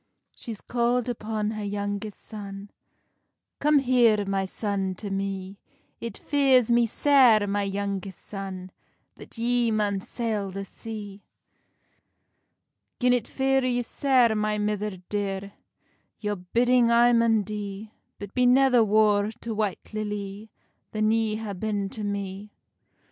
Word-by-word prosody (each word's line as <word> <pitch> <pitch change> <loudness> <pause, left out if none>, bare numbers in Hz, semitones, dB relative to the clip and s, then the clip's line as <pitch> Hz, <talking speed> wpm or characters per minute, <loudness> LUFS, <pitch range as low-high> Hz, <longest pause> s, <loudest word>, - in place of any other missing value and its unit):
She's 225 -4 -8
calld 240 0 0
upon 215 -2 -2
her 215 -1 -5
youngest 205 0 -3
son: 200 -2 -8 0.9
"Come 300 +1 +4
here, 240 -6 +4
my 195 0 0
son, 195 -1 -2
to 200 +2 -6
me; 195 0 -4 0.4
It 230 -3 -6
fears 265 -5 +3
me 235 0 +4
sair, 245 -4 +5
my 205 0 0
youngest 195 -1 -3
son, 190 -2 -7 0.5
That - - -13
ye 240 0 +1
maun 210 -2 0
sail 215 -3 -2
the 195 +1 -5
sea." 205 -1 -8 1.8
"Gin 250 0 +4
it 245 -3 0
fear 270 0 +1
you 245 -1 0
sair, 250 -2 +3
my 210 0 0
mither 210 -1 -2
dear, 200 -1 -3 0.7
Your 210 -1 -2
bidding 240 +6 +2
I 240 +1 +5
maun 230 -2 +3
dee; 205 +1 -6 0.3
But 205 -1 -9
be 250 -1 +3
never 250 -2 +5
war 210 -1 +3
to 230 - -4
White 210 -1 -3
Lilly 210 0 -5 0.4
Than 215 0 +2
ye 225 -1 +1
ha 215 -2 -5
been 200 0 -2
to 215 +1 -6
me." 200 0 -4
210 Hz, 130 wpm, -26 LUFS, 200-235 Hz, 1.8 s, sair